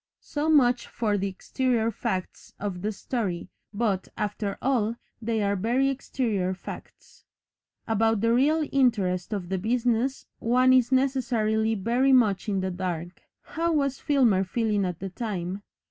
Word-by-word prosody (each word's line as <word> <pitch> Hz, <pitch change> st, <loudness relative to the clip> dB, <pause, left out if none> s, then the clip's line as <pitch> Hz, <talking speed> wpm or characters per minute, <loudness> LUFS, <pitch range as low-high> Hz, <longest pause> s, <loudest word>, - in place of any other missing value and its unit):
So 300 Hz, +2 st, -2 dB
much 250 Hz, -5 st, +4 dB
for 215 Hz, -3 st, -1 dB
the 200 Hz, 0 st, 0 dB
exterior 230 Hz, +4 st, 0 dB
facts 195 Hz, -4 st, -4 dB
of 195 Hz, -3 st, -4 dB
the 210 Hz, +3 st, -1 dB
story, 195 Hz, -5 st, -3 dB, 0.2 s
but, 205 Hz, -3 st, -1 dB
after 205 Hz, -1 st, -2 dB
all, 235 Hz, -4 st, +1 dB, 0.3 s
they 225 Hz, -1 st, 0 dB
are 200 Hz, 0 st, +1 dB
very 240 Hz, +8 st, +1 dB
exterior 220 Hz, -8 st, -1 dB
facts. -, -, -11 dB, 0.6 s
About 225 Hz, -1 st, +2 dB
the 230 Hz, +1 st, +3 dB
real 300 Hz, +5 st, +3 dB
interest 210 Hz, -9 st, +1 dB
of 195 Hz, -4 st, -3 dB
the 190 Hz, -1 st, -1 dB
business 240 Hz, +4 st, 0 dB
one 255 Hz, +2 st, +4 dB
is 255 Hz, -1 st, +4 dB
necessarily 235 Hz, -5 st, +1 dB
very 240 Hz, +7 st, +2 dB
much 220 Hz, -4 st, +3 dB
in 195 Hz, -2 st, 0 dB
the 185 Hz, 0 st, -2 dB
dark. 175 Hz, -1 st, -4 dB, 0.2 s
How 335 Hz, +1 st, -1 dB
was 275 Hz, -3 st, 0 dB
Filmer 245 Hz, -10 st, +3 dB
feeling 210 Hz, 0 st, 0 dB
at 180 Hz, -2 st, -3 dB
the 195 Hz, +2 st, -5 dB
time? 190 Hz, -2 st, -4 dB
225 Hz, 145 wpm, -26 LUFS, 195-255 Hz, 0.6 s, much